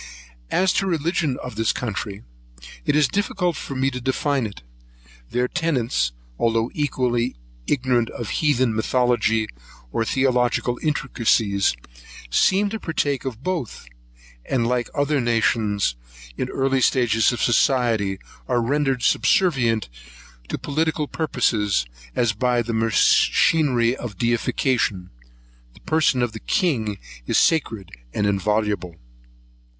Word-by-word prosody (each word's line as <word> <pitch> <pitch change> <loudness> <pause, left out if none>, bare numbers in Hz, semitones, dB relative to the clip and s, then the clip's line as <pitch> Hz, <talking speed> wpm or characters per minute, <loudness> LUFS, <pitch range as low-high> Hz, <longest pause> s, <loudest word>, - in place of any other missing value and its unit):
As 185 -1 +2
to 195 - +1
the - - -1
religion 160 -4 0
of 125 - -6
this 110 0 +1
country, 100 - -4 0.6
it - - +3
is 150 -2 +4
difficult 180 -2 -1
for 140 - -6
me 135 +1 +1
to 125 0 -5
define 135 0 0
it. 100 -12 -12 0.7
Their 125 0 0
tenets, 125 - 0 0.3
although 115 0 +1
equally 125 -4 0 0.3
ignorant 125 -4 +1
of 110 -5 -6
heathen 130 -6 +2
mythology 115 -1 +1 0.5
or 115 - 0
theological 125 -1 +1
intricacies, 115 - +1 0.6
seem 195 - +3
to 220 - -3
partake 145 -7 -1
of 130 -1 -5
both; 165 - -3 0.6
and, 125 -3 0
like 120 0 0
other 145 -1 +1
nations 110 - +1 0.4
in - - -2
the - - -8
early 135 0 +1 0.2
ages 115 -3 +3
of 120 - -4
society, 115 -6 +2 0.3
are 125 -2 +1
rendered 135 +1 0
subservient 120 - +2 0.6
to - - -2
political 155 +1 -1
purposes, 110 - 0 0.3
as 120 -3 +2
by 120 +2 +1
the 115 +1 -4
machinery 120 +3 +3
of 110 -7 -7
deification 115 -4 0 0.6
the - - -17
person 155 -5 +2
of 120 - -1
the 110 - -8
king 115 - 0 0.3
is - - +2
sacred 115 - +1 0.2
and 105 - +1
inviolable. 100 -2 0
125 Hz, 125 wpm, -22 LUFS, 110-140 Hz, 0.7 s, is